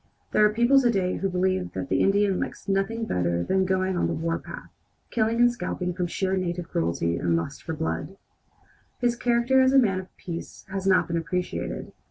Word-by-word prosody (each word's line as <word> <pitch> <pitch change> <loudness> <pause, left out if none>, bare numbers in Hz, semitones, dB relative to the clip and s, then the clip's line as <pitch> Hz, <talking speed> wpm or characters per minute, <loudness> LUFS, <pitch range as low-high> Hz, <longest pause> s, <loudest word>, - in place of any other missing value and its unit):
There - - +4
are 210 - +6
people 240 +5 +4
to 245 - +3
day 190 -5 0
who 195 - -1
believe 185 0 0
that 135 - -4
the - - +2
Indian 200 -1 +3
likes - - -5
nothing 200 +4 0
better 85 - 0
than 190 - +1
going 185 0 0
on 175 - +1
the - - -1
warpath, 165 0 -4 0.4
killing 225 0 +1
and 240 0 +6
scalping 180 -4 -3
from 180 0 -2
sheer 190 +2 -1
native 175 -2 -3
cruelty 85 0 0
and 85 -1 +1
lust 85 +12 -3
for 160 - -4
blood. 160 +4 -3 0.8
His 240 -1 +1
character 240 +2 +3
as 260 0 +4
a - - +6
man 200 -8 +3
of 185 - -12
peace 170 -1 -7
has 195 0 -3
not 190 -1 +4
been 170 - -1
appreciated. 180 +2 -3
190 Hz, 200 wpm, -26 LUFS, 170-220 Hz, 0.8 s, are